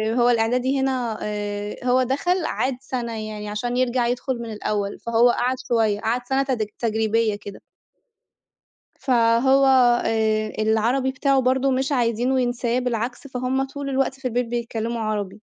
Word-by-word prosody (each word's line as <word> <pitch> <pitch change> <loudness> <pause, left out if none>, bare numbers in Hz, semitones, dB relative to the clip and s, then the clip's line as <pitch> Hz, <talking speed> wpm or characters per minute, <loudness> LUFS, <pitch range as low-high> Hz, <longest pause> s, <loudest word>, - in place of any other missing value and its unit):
هو 245 0 +4
الإعدادي 250 +4 +1
هنا 250 -5 -1
آآ، 205 0 -4
هو 255 +1 +3
دخَل 335 +7 0
عاد 260 0 -1
سَنة 235 -5 -4
يعني 210 -1 -6
عشان 240 +4 -2
يرجَع 250 -1 +1
يدخُل 245 +1 -2
من 230 -1 -6
الأول 205 -1 -3
فهو 235 +1 +3
قعَد 250 +2 +1
شوية، 220 -3 +1
قعَد 235 +3 -1
سَنة 270 +1 +2
تد 250 -5 -1
تجريبيّة 220 -1 +1
كده. 205 -1 -10 1.3
فهو 260 +2 +3 0.4
آآ، 215 -1 0
العربي 230 +5 +1
بتاعه 275 0 +2
برضه 260 +1 +2
مش 265 +2 0
عايزينه 245 +1 +1
ينساه، 245 0 0
بالعكس 245 +1 -3
فهُم 260 0 -1
طُول 280 +1 -6
الوقت 270 0 0
في 255 - -2
البيت 245 +1 -1
بيتكلّموا 235 -1 -3
عربي. 210 -2 -3
240 Hz, 145 wpm, -23 LUFS, 220-260 Hz, 1.3 s, هو